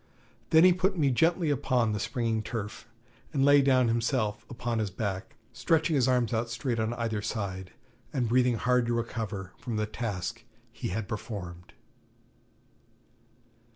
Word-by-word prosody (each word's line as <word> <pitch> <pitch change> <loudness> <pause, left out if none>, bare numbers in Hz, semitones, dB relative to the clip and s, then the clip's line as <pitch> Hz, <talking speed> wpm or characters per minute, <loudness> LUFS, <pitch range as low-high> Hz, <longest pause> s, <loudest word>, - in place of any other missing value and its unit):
Then 160 +1 +6
he 185 0 +7
put 190 +2 0
me 140 -4 +3
gently 165 +4 +2
upon 125 -5 +1
the 105 - -2
springy 115 0 -1
turf, 110 -1 -6 0.4
and 140 -3 +2
lay 145 0 +7
down 130 -2 +4
himself 115 -2 0
upon 120 -1 -2
his 105 -2 -1
back, 95 0 -4 0.2
stretching 160 -1 +1
his 130 -3 +3
arms 125 -3 +2
out 115 +1 0
straight 115 0 -2
on 110 +2 -1
either 115 -3 -2
side, 95 -4 -4 0.4
and 125 -5 0
breathing 125 +1 +3
hard 125 +1 +2
to 120 - +1
recover 110 -5 -4
from 120 -3 -4
the 105 0 0
task 105 -4 -4 0.3
he - - -5
had 100 +2 -3
performed. 90 -5 -6
115 Hz, 155 wpm, -29 LUFS, 105-130 Hz, 0.4 s, he